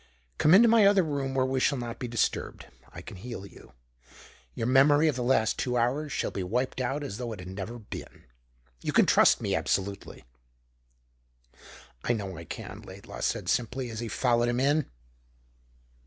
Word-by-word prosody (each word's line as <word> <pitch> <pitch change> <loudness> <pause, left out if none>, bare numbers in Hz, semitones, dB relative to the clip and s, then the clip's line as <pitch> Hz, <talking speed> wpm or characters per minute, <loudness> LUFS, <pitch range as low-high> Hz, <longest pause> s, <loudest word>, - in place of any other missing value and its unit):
"Come 155 +4 +6
into 230 +4 +7
my 225 -3 +6
other 200 -2 +4
room 140 -4 -3
where 130 -1 +2
we 130 0 0
shall 140 +2 +2
not 120 -2 -6
be 125 - -4
disturbed. 115 -2 -2 0.3
I - - -10
can - - -10
heal 115 0 -7
you. - - -16 0.8
Your 115 - -2
memory 145 +5 +5
of 150 - +1
the 125 - -3
last 120 -4 +1
two 125 -2 -1
hours 135 +6 0
shall - - -2
be 95 - -4
wiped 125 +8 -2
out 135 +4 -2
as 100 -7 -5
though 120 -1 -5
it 105 - -10
had 90 0 -8
never 100 +5 -6
been. 110 - -10 0.6
You - - -3
can - - +5
trust - - +5
me - - -1
absolutely." 100 0 -2 1.8
"I 120 - +1
know 100 -5 -4
I 85 +1 -9
can," - - -8
Laidlaw - - -11
said - - -1
simply, 125 +1 -1
as 110 - -6
he 120 - -4
followed 120 0 +1
him 120 +1 0
in. 145 +2 +1
125 Hz, 185 wpm, -28 LUFS, 115-135 Hz, 1.8 s, into